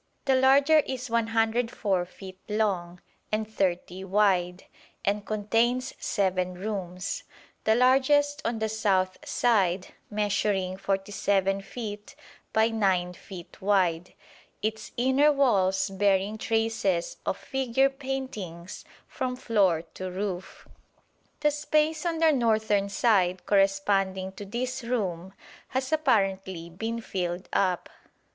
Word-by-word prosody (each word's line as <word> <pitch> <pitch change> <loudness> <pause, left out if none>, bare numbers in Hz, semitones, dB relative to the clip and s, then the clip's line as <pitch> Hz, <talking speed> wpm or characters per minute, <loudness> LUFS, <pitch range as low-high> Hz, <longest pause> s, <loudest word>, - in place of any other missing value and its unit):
The 270 - +3
larger 275 +4 +5
is 255 -4 -3
104 225 -4 +1
feet 190 0 -11
long 185 -5 -1 0.3
and 215 0 -1
30 185 -2 -2
wide, 185 -3 +2 0.4
and 205 +1 0
contains 225 +5 0
seven 185 -2 0
rooms, 185 -1 -4 0.4
the 220 - +4
largest 280 +3 +3
on 230 0 -1
the 220 0 -1
south 195 -4 0
side 195 -6 +1 0.2
measuring 205 -3 0
47 195 0 0
feet 210 0 -7 0.4
by 220 +1 +3
9 190 -5 +1
feet 180 -1 -12
wide, 185 -4 +1 0.5
its 220 0 -3
inner 265 +4 +4
walls 195 -9 +2
bearing 200 +2 +1
traces 225 -6 0
of - - -1
figure 265 0 +1
paintings 260 - -6 0.2
from 255 -2 -3
floor 200 -10 +2
to 185 0 -5
roof. 185 -1 -5 0.7
The 300 0 +3
space 310 +2 +1
on 330 -1 -1
the 320 -1 +5
northern 220 -6 +2
side 190 -5 +2
corresponding 195 -1 +1
to 195 +1 -9
this 245 +5 -3
room 190 -7 -2 0.3
has 260 +1 -2
apparently 195 - 0
been 225 +6 -4
filled 180 -3 -3
up. 185 -3 +1
205 Hz, 110 wpm, -27 LUFS, 190-240 Hz, 0.7 s, larger